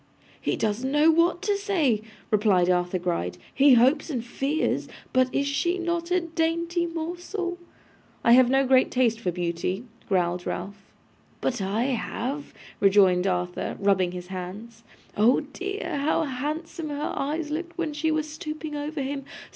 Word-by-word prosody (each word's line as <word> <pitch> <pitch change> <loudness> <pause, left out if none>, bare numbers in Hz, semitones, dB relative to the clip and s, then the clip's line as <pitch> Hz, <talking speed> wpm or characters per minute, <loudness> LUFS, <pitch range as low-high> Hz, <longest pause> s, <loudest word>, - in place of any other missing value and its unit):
'He - - 0
doesn't 225 +5 -1
know 300 +3 +5
what 340 +3 +2
to 410 0 +2
say,' 345 - +1 0.3
replied 200 -4 +4
Arthur 180 +1 +1
Gride. 170 - -2 0.2
'He 275 -1 +6
hopes 260 +8 +4
and 245 -6 -3
fears. 275 +6 -1 0.3
But 255 0 +3
is 280 - 0
she 345 +6 0
not 340 -1 -2
a 360 0 +2
dainty 335 +1 0
morsel?' 350 +2 -4 0.6
'I 235 - +5
have 250 0 +7
no 270 +1 +3
great 260 0 +4
taste 235 -3 +2
for 185 -6 -1
beauty,' 175 +4 -2 0.2
growled 180 -2 0
Ralph. 200 +2 -5 0.6
'But 245 -5 -1
I 200 +4 0
have,' 265 +2 -3 0.3
rejoined 195 -2 +5
Arthur, 180 -1 -2
rubbing 190 -3 +2
his 180 0 -7
hands. 200 +5 -7 0.3
'Oh 225 +5 +4
dear! 375 +6 -4
How 300 +3 +1
handsome 305 +4 -4
her 290 0 -3
eyes 300 +2 -2
looked 340 +2 -4
when 325 -3 -2
she 310 +2 0
was 310 -1 0
stooping 310 0 -6
over 295 0 -3
him! 275 +1 -3
270 Hz, 155 wpm, -26 LUFS, 205-320 Hz, 0.6 s, have